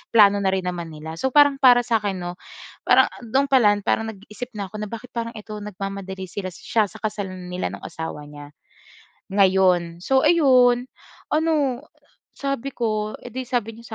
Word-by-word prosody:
plano 205 Hz, -2 st, +7 dB
na 195 Hz, -, 0 dB
rin 190 Hz, -1 st, -1 dB
naman 170 Hz, -2 st, -4 dB
nila. 160 Hz, +1 st, -7 dB
So -, -, +1 dB
parang 290 Hz, -1 st, +5 dB
para 245 Hz, -2 st, +7 dB
sa 230 Hz, -2 st, +1 dB
'kin 200 Hz, -2 st, -1 dB
'no, 175 Hz, 0 st, -6 dB, 0.5 s
parang -, -, +6 dB
do'n 265 Hz, +4 st, +1 dB
pala 225 Hz, -6 st, +5 dB
parang 225 Hz, +3 st, 0 dB
nag-iisip 210 Hz, +4 st, -9 dB
na 200 Hz, -2 st, -5 dB
ako 215 Hz, -, -7 dB
na 210 Hz, -, -3 dB
bakit 230 Hz, +2 st, -8 dB
parang 230 Hz, -1 st, -4 dB
ikaw 210 Hz, 0 st, -8 dB
nagmamadali 195 Hz, -1 st, -6 dB
sila 190 Hz, 0 st, -5 dB
siya 215 Hz, +3 st, 0 dB
sa -, -, -13 dB
kasal 205 Hz, -3 st, -3 dB
nila 180 Hz, -, -4 dB
nung 100 Hz, -, -9 dB
asawa 160 Hz, -2 st, -6 dB
niya 145 Hz, 0 st, -11 dB, 0.8 s
ngayon. 185 Hz, -3 st, +3 dB
So 265 Hz, 0 st, +3 dB
ayun, 255 Hz, -6 st, +4 dB, 0.5 s
ano 300 Hz, -5 st, +1 dB, 0.5 s
sabi 275 Hz, -1 st, -3 dB
ko 215 Hz, -2 st, -1 dB
eh, 245 Hz, -, -9 dB
di 260 Hz, 0 st, -4 dB
sabi 235 Hz, -3 st, -2 dB
niya 230 Hz, -1 st, -11 dB
215 Hz, 175 wpm, -23 LUFS, 190-245 Hz, 0.8 s, plano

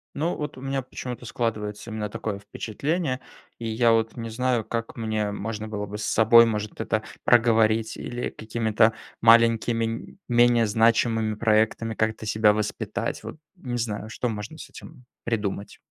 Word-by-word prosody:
Ну, 160 Hz, +5 st, 0 dB
вот 150 Hz, -3 st, -5 dB
у -, -, -10 dB
меня 135 Hz, 0 st, -2 dB
почему-то 125 Hz, -1 st, -7 dB
складывается 110 Hz, -2 st, -3 dB
именно 105 Hz, -1 st, -3 dB
такое 105 Hz, -1 st, -4 dB
впечатление. 130 Hz, -, -2 dB, 0.4 s
И 115 Hz, -, -4 dB
я 115 Hz, +1 st, +3 dB
вот 115 Hz, 0 st, +1 dB
не 115 Hz, -1 st, -5 dB
знаю, 125 Hz, 0 st, 0 dB
как 115 Hz, +1 st, -4 dB
мне 110 Hz, -2 st, -1 dB
можно 105 Hz, +1 st, -4 dB
было 105 Hz, -1 st, -4 dB
бы 105 Hz, +1 st, -7 dB
с 105 Hz, -, -4 dB
собой 115 Hz, +1 st, +6 dB
может 105 Hz, -2 st, -3 dB
это 110 Hz, -1 st, -1 dB, 0.2 s
проговорить, 115 Hz, -2 st, +3 dB
или 120 Hz, 0 st, -4 dB
какими-то 110 Hz, 0 st, +1 dB, 0.3 s
маленькими, 115 Hz, 0 st, +5 dB
м, 115 Hz, +10 st, -6 dB
менее 120 Hz, -1 st, +4 dB
значимыми 110 Hz, 0 st, +2 dB
проектами 110 Hz, +1 st, +1 dB
как-то 110 Hz, 0 st, -1 dB
себя 105 Hz, 0 st, +4 dB
воспитать. 105 Hz, 0 st, -3 dB
Вот -, -, -7 dB, 0.2 s
не 125 Hz, -7 st, -4 dB
знаю, 110 Hz, -2 st, -3 dB
что 120 Hz, +2 st, -2 dB
можно 110 Hz, +7 st, -6 dB
с 140 Hz, -, -10 dB
этим 125 Hz, -, -13 dB, 0.2 s
придумать. 105 Hz, -3 st, -3 dB
115 Hz, 160 wpm, -25 LUFS, 110-120 Hz, 0.4 s, собой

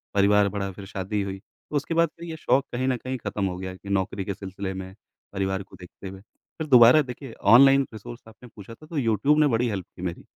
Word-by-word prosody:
परिवार 100 Hz, 0 st, +4 dB
बढ़ा, 100 Hz, -1 st, -4 dB
फिर 95 Hz, +1 st, -10 dB
शादी 100 Hz, +1 st, -3 dB
हुई, 95 Hz, 0 st, -5 dB, 0.3 s
उसके 145 Hz, +3 st, -2 dB
बाद 165 Hz, -1 st, +3 dB
फिर 170 Hz, -, -7 dB
ये 160 Hz, -, -5 dB
शौक 135 Hz, -1 st, +1 dB
कहीं 130 Hz, +2 st, -1 dB
न 130 Hz, -2 st, +1 dB
कहीं 130 Hz, +2 st, -5 dB
ख़त्म 100 Hz, -3 st, -3 dB
हो 90 Hz, -1 st, -3 dB
गया 95 Hz, 0 st, -6 dB
कि 100 Hz, +1 st, -12 dB
नौकरी 95 Hz, 0 st, -1 dB
के 100 Hz, -, -3 dB
सिलसिले 95 Hz, 0 st, -6 dB
में, 95 Hz, 0 st, -7 dB, 0.4 s
परिवार 95 Hz, 0 st, -2 dB
को -, -, -17 dB
देखते 90 Hz, +2 st, -11 dB
हुए। 95 Hz, 0 st, -11 dB
फिर 155 Hz, +8 st, -11 dB
दोबारा 125 Hz, +3 st, +7 dB
देखिए, 125 Hz, -2 st, -8 dB
ऑनलाइन 135 Hz, +6 st, +6 dB
रिसोर्स 120 Hz, +3 st, -9 dB
आपने 115 Hz, +2 st, -15 dB
पूछा 105 Hz, +2 st, -11 dB
था, 155 Hz, -, -16 dB
तो 155 Hz, -1 st, -7 dB
यूट्यूब 130 Hz, +5 st, +2 dB
ने 150 Hz, -, +5 dB
बड़ी 120 Hz, -1 st, +1 dB
हेल्प 95 Hz, -4 st, -4 dB
की -, -, -11 dB
मेरी। 90 Hz, -2 st, -4 dB
105 Hz, 230 wpm, -25 LUFS, 95-130 Hz, 0.4 s, दोबारा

